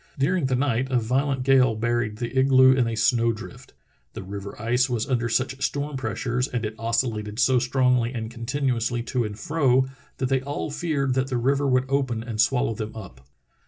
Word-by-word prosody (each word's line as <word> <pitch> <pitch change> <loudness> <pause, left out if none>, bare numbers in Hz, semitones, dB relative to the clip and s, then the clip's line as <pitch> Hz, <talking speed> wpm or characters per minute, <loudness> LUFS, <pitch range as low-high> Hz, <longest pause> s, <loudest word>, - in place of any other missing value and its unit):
During 145 +2 +1
the 130 - 0
night 130 -1 0
a 130 - +2
violent 130 +3 0
gale 130 -3 +4
buried 120 -1 -1
the 120 +2 -5
igloo 130 0 +6
in 130 -2 +2
a 115 - -2
snow 115 +2 +2
drift. 110 - -10 0.4
The - - -7
river 100 +1 -8
ice 125 +4 +1
was 120 -3 -1
under 120 -3 0
such 130 +3 -1
storm 145 0 -2
pressures 125 -1 -2
and 120 -3 -3
it 105 - -4
oscillated 115 -2 -1
so 130 0 +3
strongly 125 -1 +1
and 115 -3 -5
continuously 120 -1 -1
to 125 0 -1
and 105 -1 -6
fro 135 -3 +2 0.3
that 130 - -1
they 135 0 +1
all 145 +2 -4
feared 145 -4 -1
that 130 +1 0
the 130 -2 -2
river 140 +4 +1
would 130 -1 +2
open 130 -4 -1
and 115 -2 -1
swallow 125 0 +1
them 110 0 -6
up. 90 - -10
125 Hz, 195 wpm, -24 LUFS, 115-135 Hz, 0.4 s, igloo